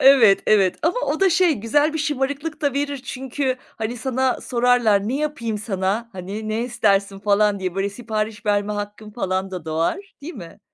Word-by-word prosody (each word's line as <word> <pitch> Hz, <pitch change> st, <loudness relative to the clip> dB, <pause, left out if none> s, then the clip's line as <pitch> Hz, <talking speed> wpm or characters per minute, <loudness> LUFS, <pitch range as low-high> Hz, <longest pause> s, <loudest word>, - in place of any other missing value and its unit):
Evet, 250 Hz, -8 st, +7 dB
evet. 195 Hz, -4 st, +4 dB
Ama 355 Hz, +10 st, +1 dB
o 310 Hz, +5 st, -1 dB
da 385 Hz, -1 st, +5 dB
şey, 355 Hz, 0 st, +4 dB
güzel 290 Hz, +8 st, +1 dB
bir 320 Hz, -, -2 dB
şımarıklık 295 Hz, +2 st, -2 dB
da 285 Hz, -2 st, +1 dB
verir, 285 Hz, 0 st, -1 dB
çünkü, 265 Hz, 0 st, -2 dB
hani, 225 Hz, +2 st, -5 dB
sana 260 Hz, +1 st, 0 dB
sorarlar, 235 Hz, -4 st, +2 dB
"Ne 260 Hz, -, 0 dB
yapayım 265 Hz, -8 st, -2 dB
sana, 200 Hz, +2 st, -1 dB
hani, 195 Hz, +4 st, -6 dB
ne 220 Hz, +2 st, -1 dB
istersin?" 200 Hz, -5 st, +1 dB
falan 205 Hz, 0 st, +2 dB
diye. 185 Hz, -1 st, -2 dB
Böyle, 195 Hz, +1 st, 0 dB
sipariş 215 Hz, 0 st, -4 dB
verme 205 Hz, 0 st, +1 dB
hakkın 205 Hz, +1 st, -6 dB
falan 190 Hz, -3 st, -2 dB
da 180 Hz, -4 st, -6 dB
doğar, 165 Hz, -, -2 dB
değil 330 Hz, +4 st, -7 dB
mi? 175 Hz, -2 st, -11 dB
225 Hz, 180 wpm, -22 LUFS, 200-275 Hz, -, Evet